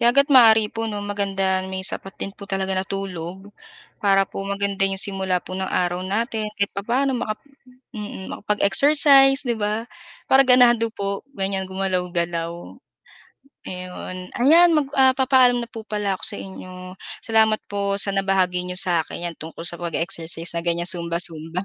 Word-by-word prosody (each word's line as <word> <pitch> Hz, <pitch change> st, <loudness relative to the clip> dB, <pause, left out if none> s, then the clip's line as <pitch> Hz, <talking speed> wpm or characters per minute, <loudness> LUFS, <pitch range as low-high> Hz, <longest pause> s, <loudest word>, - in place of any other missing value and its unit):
kaya 235 Hz, -, +4 dB
hangga't 280 Hz, +3 st, +3 dB
maaari 220 Hz, -4 st, +6 dB
po, 225 Hz, 0 st, -3 dB
'no, 205 Hz, -1 st, -5 dB
maganda 195 Hz, -2 st, -1 dB
may 190 Hz, 0 st, -5 dB
sapat 195 Hz, 0 st, -4 dB
din 195 Hz, -, -5 dB
po 200 Hz, 0 st, -13 dB
talaga 195 Hz, -1 st, -2 dB
na 185 Hz, -, 0 dB
tulog 190 Hz, 0 st, -7 dB, 0.5 s
para 195 Hz, -1 st, +3 dB
po 195 Hz, -, -8 dB
maganda 200 Hz, 0 st, -1 dB
'yong 195 Hz, -, -3 dB
simula 190 Hz, -2 st, +1 dB
po 180 Hz, -, -7 dB
ng 190 Hz, 0 st, -3 dB
araw 180 Hz, 0 st, -1 dB
natin. 215 Hz, +3 st, -2 dB
Kahit 200 Hz, 0 st, -1 dB
papa'no 250 Hz, +7 st, -1 dB
maka 225 Hz, -3 st, -3 dB, 0.6 s
mm, 205 Hz, -2 st, -7 dB
makapag-exercise, 270 Hz, +6 st, +4 dB
'di 235 Hz, -, +1 dB
ba, 215 Hz, +2 st, -2 dB, 0.4 s
para 270 Hz, +1 st, +6 dB
ganahan 250 Hz, -2 st, +6 dB
daw 230 Hz, 0 st, -2 dB
po, 200 Hz, -2 st, -4 dB, 0.2 s
ganyan, 195 Hz, 0 st, -1 dB
gumalaw-galaw. 180 Hz, -3 st, -2 dB, 1.2 s
Ayon, 185 Hz, 0 st, -7 dB
ayan 330 Hz, +8 st, +6 dB
mag 290 Hz, -, 0 dB
ah, 265 Hz, -1 st, +5 dB
papaalam 260 Hz, -2 st, +4 dB
na -, -, -13 dB
po 225 Hz, -, -7 dB
pala 205 Hz, -2 st, -1 dB
ako -, -, -19 dB
sa -, -, -5 dB
inyo. 185 Hz, -1 st, -10 dB, 0.3 s
Salamat 220 Hz, -1 st, +3 dB
po 200 Hz, -1 st, -2 dB
sa 200 Hz, 0 st, +1 dB
nabahagi 190 Hz, -2 st, +1 dB
niyo 180 Hz, -, -5 dB
sa 180 Hz, -3 st, +4 dB
akin, 175 Hz, -, -9 dB
'yan 170 Hz, -2 st, -5 dB
tungkol 165 Hz, +1 st, -8 dB
sa 175 Hz, 0 st, -4 dB
pag-exercise 165 Hz, -1 st, -1 dB
na 170 Hz, -, -2 dB
ganyan, 170 Hz, 0 st, -1 dB
zumba-zumba. 170 Hz, 0 st, -1 dB
195 Hz, 165 wpm, -22 LUFS, 185-225 Hz, 1.2 s, maaari